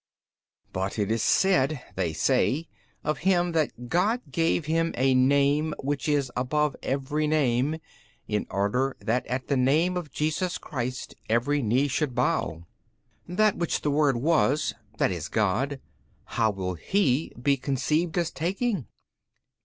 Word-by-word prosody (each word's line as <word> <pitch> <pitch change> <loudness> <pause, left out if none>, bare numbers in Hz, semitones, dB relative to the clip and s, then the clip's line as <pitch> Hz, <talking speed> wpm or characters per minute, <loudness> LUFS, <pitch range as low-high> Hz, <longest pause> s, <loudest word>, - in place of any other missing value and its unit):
B. - - -53
But 95 +3 -2
it 105 0 0
is 115 0 +1
said 155 -6 +3 0.2
(they 90 -4 0
say) 130 - +1 0.4
of 150 - -1
Him 180 -2 +2
that 150 -7 -1
God 205 - +1
gave 165 +1 +1
Him 165 +2 0
a 130 +1 +3
Name 140 +4 +3
which 145 +2 -2
is 140 -4 +1
above 145 +3 0
every 145 +3 -1
name, 145 -1 +1 0.5
in 105 -1 -1
order 125 +7 0
that 120 +2 -1
at 125 +1 -3
the 140 - +1
name 150 +8 +2
of 170 -6 -4
Jesus 155 +5 -1
Christ 130 -1 -5 0.2
every 135 +6 +2
knee 125 +5 +2
should 140 -2 -1
bow. 120 - 0 0.6
That 205 +4 +2
which 170 - -1
the 150 - 0
Word 145 -3 +3
was, 150 +1 +2 0.3
i.e., 90 -3 +1
God, 120 +7 0 0.4
how 110 -1 0
will 95 -3 -3
He 140 - +1
be 140 +3 +3
conceived 150 +6 -1
as 170 -2 0
taking? 190 - -2
140 Hz, 145 wpm, -26 LUFS, 125-160 Hz, 0.6 s, said